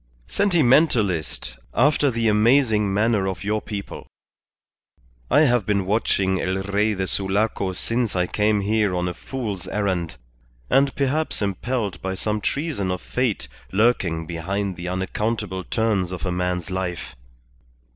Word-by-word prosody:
"Sentimentalist, 120 - +2 0.2
after 145 +3 +4
the 115 -2 0
amazing 110 -1 +3
manner 105 -1 +2
of 95 -2 -4
your 105 +1 0
people. 100 -2 -7 1.2
I 145 - +5
have 125 -6 +3
been 100 -2 +1
watching 95 -2 +1
El 95 +1 -1
Rey 105 +2 +1
de 95 0 -1
Sulaco 100 0 0
since 115 +3 -1
I 90 -1 +2
came 105 +2 +1
here 105 -2 +1
on 90 0 0
a 90 - -2
fool's 105 -5 -5
errand, 90 -8 -1 0.5
and 135 0 +3
perhaps 140 -2 0
impelled 100 -1 -2
by 95 0 -3
some 105 +2 -2
treason 140 - -1
of 90 0 -1
fate 115 - -1 0.2
lurking 95 -6 +2
behind 95 +4 -3
the 90 +1 -6
unaccountable 95 +1 -2
turns 105 -4 0
of 90 -1 -4
a 90 - -1
man's 90 +1 -2
life. 90 -7 -4
100 Hz, 135 wpm, -23 LUFS, 95-115 Hz, 1.2 s, I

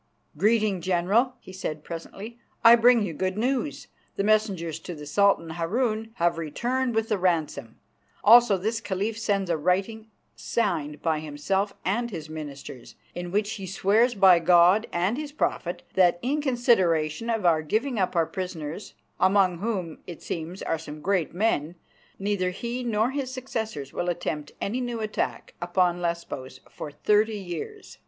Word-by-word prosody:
"Greeting, 210 +1 +2
General," 190 +9 +1
he 185 - -13
said 155 -5 -5
presently. 200 +7 -8 0.2
"I 230 +1 +10
bring 235 -1 +5
you 180 -5 -3
good 185 +5 -2
news. 260 +5 -1 0.3
The 195 - -1
messengers 195 -7 +1
to 175 +1 -7
the 150 -1 -9
Sultan 180 0 +2
Harun 215 +7 -1
have 170 -4 +1
returned 240 - -1
with 225 0 +1
the 210 -3 +1
ransom. 155 -9 -1 0.5
Also 230 -2 +7
this 220 +5 -2
Caliph 205 +2 -2
sends 195 -5 0
a 165 - +1
writing 195 +7 -1 0.3
signed 150 -10 -2
by 160 -2 +1
himself 175 +7 -2
and 235 +6 0
his 160 -6 -7
ministers, 140 -5 -8 0.2
in 175 0 -5
which 205 +3 0
he 195 -3 -6
swears 215 +6 +2
by 190 -3 +7
God 175 +5 +5
and 185 +9 0
His 300 -1 -5
Prophet 180 - -2
that 180 -2 +4
in 285 +4 0
consideration 230 - +2
of 225 -4 -1
our 160 -2 +4
giving 220 - -1
up 185 -2 0
our 165 -1 +3
prisoners, 180 -1 -6 0.2
among 185 -2 +3
whom, 190 -6 -3
it 175 - -9
seems, 170 +3 -5
are 165 - -1
some 150 -1 -9
great 185 -3 0
men, 175 -5 0 0.4
neither 195 -2 0
he 235 +7 -4
nor 225 +1 +1
his 270 -2 -3
successors 220 - -5
will 175 - -2
attempt 150 -3 -3
any 240 +6 -2
new 240 -2 -3
attack 215 -1 -3
upon 175 0 +1
Lesbos 170 -6 -4
for - - -7
thirty 210 +8 +2
years. 195 - -7
190 Hz, 160 wpm, -26 LUFS, 170-225 Hz, 0.5 s, I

